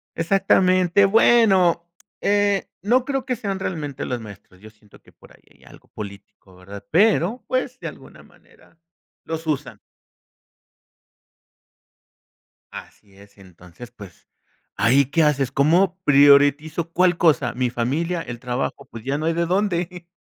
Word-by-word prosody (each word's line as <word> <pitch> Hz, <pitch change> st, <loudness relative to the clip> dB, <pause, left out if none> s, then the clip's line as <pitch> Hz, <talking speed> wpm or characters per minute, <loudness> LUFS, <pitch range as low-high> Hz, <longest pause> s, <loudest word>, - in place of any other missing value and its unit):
Exactamente. 185 Hz, +1 st, +2 dB
Bueno, 195 Hz, -6 st, +3 dB, 0.3 s
eh, 205 Hz, -1 st, +1 dB
no 245 Hz, +6 st, +1 dB
creo 270 Hz, -2 st, -3 dB
que 255 Hz, -1 st, -2 dB
sean 200 Hz, -4 st, -5 dB
realmente 150 Hz, -7 st, -5 dB
los 125 Hz, -1 st, -4 dB
maestros. 100 Hz, -4 st, -14 dB
Yo 110 Hz, +2 st, -14 dB
siento 110 Hz, -1 st, -22 dB
que -, -, -22 dB
por -, -, -21 dB
ahí -, -, -21 dB
hay -, -, -25 dB
algo -, -, -18 dB
político, 100 Hz, -2 st, -12 dB
¿verdad?, 100 Hz, +2 st, -12 dB
pero, 205 Hz, +4 st, +2 dB
pues, 255 Hz, 0 st, -3 dB
de -, -, -6 dB
alguna -, -, -13 dB
manera -, -, -24 dB, 0.5 s
los 160 Hz, 0 st, -6 dB
usan. 135 Hz, -8 st, -3 dB, 2.9 s
Así 100 Hz, -2 st, -13 dB
es, 100 Hz, +1 st, -19 dB
entonces, 90 Hz, +4 st, -15 dB
pues, 100 Hz, -7 st, -15 dB, 0.5 s
¿ahí 130 Hz, +4 st, +3 dB
qué 160 Hz, +5 st, +1 dB
haces? 140 Hz, -4 st, +1 dB
¿Cómo 175 Hz, +7 st, +2 dB
priorizo 145 Hz, +3 st, +3 dB
cuál 180 Hz, 0 st, +2 dB
cosa?, 160 Hz, -4 st, +2 dB
mi 125 Hz, 0 st, -1 dB
familia, 160 Hz, +9 st, -2 dB
el 120 Hz, -6 st, -8 dB
trabajo, 125 Hz, +1 st, -4 dB
pues, 115 Hz, -1 st, -10 dB
ya 135 Hz, +3 st, -2 dB
no 155 Hz, -, -4 dB
hay 165 Hz, -, +1 dB
de 170 Hz, +1 st, -1 dB
dónde. 180 Hz, -2 st, -2 dB
160 Hz, 140 wpm, -21 LUFS, 120-185 Hz, 2.9 s, Bueno